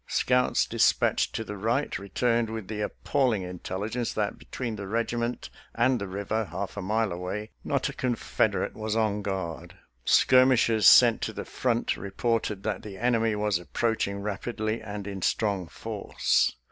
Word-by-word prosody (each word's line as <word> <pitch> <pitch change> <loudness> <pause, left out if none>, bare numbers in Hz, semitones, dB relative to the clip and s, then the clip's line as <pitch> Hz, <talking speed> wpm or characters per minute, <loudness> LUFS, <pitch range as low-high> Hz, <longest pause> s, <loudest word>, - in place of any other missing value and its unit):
Scouts 125 0 +2
dispatched - - +2
to 115 - -2
the 105 -1 -6
right 115 +8 -1
returned 115 +3 0
with 110 -3 -5
the 105 -1 -3
appalling 120 -2 0
intelligence 95 +6 -4
that 105 -1 -2
between 120 -4 -5
the 100 -2 -6
regiment 115 +2 -2 0.2
and 130 -3 +2
the 100 - -3
river, 100 +3 -2
half 95 +2 -5
a 100 - -4
mile 110 +2 0
away, 90 +5 -4
not - - 0
a - - -5
Confeder 125 -3 0
ate - - -8
was 110 0 -3
on 105 -2 +1
guard; 95 -5 -4 0.3
skirmishers 125 -5 +5
sent - - +7
to - - -2
the - - -6
front 120 -2 -1
reported 105 0 -2
that 105 -3 -2
the 100 -2 -9
enemy 115 -1 +1
was 105 -3 0
approaching 100 +1 -1
rap 105 +1 -4
idly 110 -1 -2
and 105 -2 -6
in 100 -2 -5
strong 100 -3 0
force. - - 0
110 Hz, 160 wpm, -27 LUFS, 100-115 Hz, 0.3 s, sent